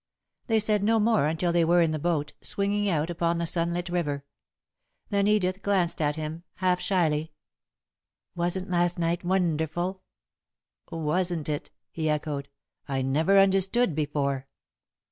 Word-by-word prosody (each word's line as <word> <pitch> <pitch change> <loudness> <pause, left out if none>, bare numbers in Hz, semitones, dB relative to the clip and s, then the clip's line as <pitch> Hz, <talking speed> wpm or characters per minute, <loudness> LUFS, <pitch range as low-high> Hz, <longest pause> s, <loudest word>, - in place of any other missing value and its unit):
They 225 -2 +3
said 210 -1 +3
no 225 +2 +3
more 215 -8 +3
until 165 +3 0
they 170 -1 +3
were 170 +1 +4
in 165 - +1
the 155 - -2
boat, 150 -2 -1
swinging 200 +1 +1
out 160 -1 0
upon 170 0 0
the 170 - -1
sunlit 170 +1 -1
river. 150 -5 -2 0.9
Then 200 0 +2
Edith 195 -2 +1
glanced 185 -5 0
at 150 -1 +1
him, 155 +1 -5
half 180 -1 +1
shyly. 160 -5 0 1.0
"Wasn't 175 +2 -1
last 175 0 +1
night 170 +1 -1
wonderful?" 175 0 -1 0.9
"Wasn't 165 0 -1
it!" 145 -1 -3 0.2
he 155 -1 -2
echoed. 150 -2 -2 0.4
"I 135 -1 -1
never 160 +9 +2
understood 195 +2 +3
before." 140 -3 -2
170 Hz, 140 wpm, -27 LUFS, 155-190 Hz, 1.0 s, were